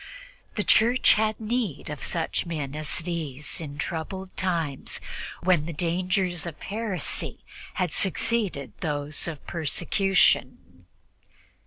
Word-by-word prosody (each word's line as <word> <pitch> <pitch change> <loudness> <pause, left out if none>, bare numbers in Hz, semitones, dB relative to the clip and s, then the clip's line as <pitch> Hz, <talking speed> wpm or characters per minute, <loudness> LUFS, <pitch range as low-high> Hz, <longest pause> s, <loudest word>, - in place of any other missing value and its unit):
The 210 - +1
Church 240 +5 +6
had 215 0 +1
need 220 - -1
of 150 - -5
such 165 +1 -1
men 150 -5 -3
in 155 +1 -4 0.2
these 155 -4 -3 0.2
troublous 185 +5 -4
times, 165 -7 -1 0.4
when 175 -4 +4
the 170 - -3
dangers 180 +2 0
of 165 - -7
heresy 205 -5 -3 0.3
had 180 -4 0
succeeded 195 -5 +1
to 175 - -1
those 145 +1 -1
of 155 -4 -6
persecution. 175 +4 +1
175 Hz, 115 wpm, -27 LUFS, 155-195 Hz, 0.4 s, Church